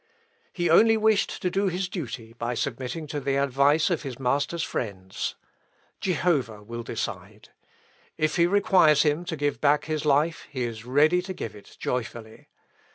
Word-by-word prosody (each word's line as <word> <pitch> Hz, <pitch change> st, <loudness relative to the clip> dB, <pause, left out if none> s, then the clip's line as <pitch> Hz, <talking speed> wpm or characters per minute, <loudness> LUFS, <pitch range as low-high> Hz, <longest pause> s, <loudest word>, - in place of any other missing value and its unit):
He 175 Hz, -1 st, -1 dB
only 225 Hz, +7 st, +6 dB
wished 220 Hz, -1 st, +1 dB
to 180 Hz, -, +1 dB
do 195 Hz, +2 st, +1 dB
his 185 Hz, +1 st, -1 dB
duty 125 Hz, -, -6 dB
by 120 Hz, +1 st, -3 dB
submitting 130 Hz, +5 st, -3 dB
to 150 Hz, 0 st, -4 dB
the 140 Hz, -1 st, -1 dB
advice 140 Hz, +5 st, +3 dB
of 165 Hz, -, 0 dB
his 135 Hz, -5 st, -6 dB
master's 140 Hz, +5 st, 0 dB
friends. 95 Hz, -5 st, -4 dB, 0.6 s
Jehovah 145 Hz, -, 0 dB
will 115 Hz, +2 st, -6 dB
decide. 115 Hz, -, -6 dB, 0.7 s
If 155 Hz, 0 st, +1 dB
he 170 Hz, 0 st, +5 dB
requires 185 Hz, -6 st, +4 dB
him 150 Hz, +3 st, 0 dB
to 170 Hz, -, -3 dB
give 145 Hz, 0 st, -1 dB
back 145 Hz, 0 st, +3 dB
his 155 Hz, -2 st, -2 dB
life, 150 Hz, +3 st, +1 dB
he 130 Hz, -4 st, -3 dB
is 115 Hz, -1 st, -5 dB
ready 150 Hz, +8 st, +3 dB
to 185 Hz, +1 st, -6 dB
give 110 Hz, -, -6 dB
it 105 Hz, -, -15 dB
joyfully. 115 Hz, -2 st, -5 dB
145 Hz, 160 wpm, -26 LUFS, 125-175 Hz, 0.7 s, only